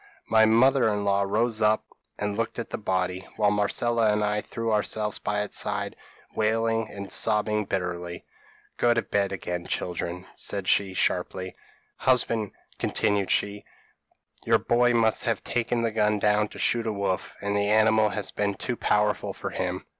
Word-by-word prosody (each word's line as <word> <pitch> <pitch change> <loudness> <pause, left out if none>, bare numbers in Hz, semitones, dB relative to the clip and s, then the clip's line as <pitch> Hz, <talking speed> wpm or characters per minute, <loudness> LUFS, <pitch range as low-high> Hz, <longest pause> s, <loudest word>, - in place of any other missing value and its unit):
p> - - -25 0.3
"My 110 -1 +6
mother 130 +2 +4
in 105 -1 -2
law 100 0 +2
rose 110 +3 0
up, 105 0 +3 0.3
and 105 0 -2
looked 115 +1 -2
at 115 - -5
the - - -3
body, 95 -2 -2
while 105 -2 +3
Marcella 110 +2 +1
and 105 0 +1
I 105 0 0
threw 115 +1 -4
ourselves 105 0 0
by 105 0 -1
its 105 - -3
side, - - -2 0.4
wailing 115 +1 +1
and 100 -1 -7
sobbing 105 -1 +2
bitterly. 90 -2 -4 0.5
"'Go 120 -1 +3
to 120 - +1
bed 100 -1 0
again, 90 -2 -4
children,' 90 +1 -3
said 100 -2 -1
she, 95 -1 +2
sharply. 95 +1 -1 0.4
'Husband,' 115 -4 +2 0.3
continued 100 -2 0
she, 100 0 0 0.8
'your - - +4
boy 120 0 +2
must 110 0 +2
have 115 -4 -1
taken 120 0 -1
the 115 - 0
gun 105 -1 +2
down, 105 +1 +2
to - - -13
shoot 115 -1 +1
a - - 0
wolf, 100 -2 -2
and 100 0 -2
the 100 0 +1
animal 110 0 +4
has 105 -1 -1
been 100 -1 -1
too 125 - -3
powerful 105 -2 0
for - - -6
him. - - -3
105 Hz, 170 wpm, -26 LUFS, 100-115 Hz, 0.8 s, My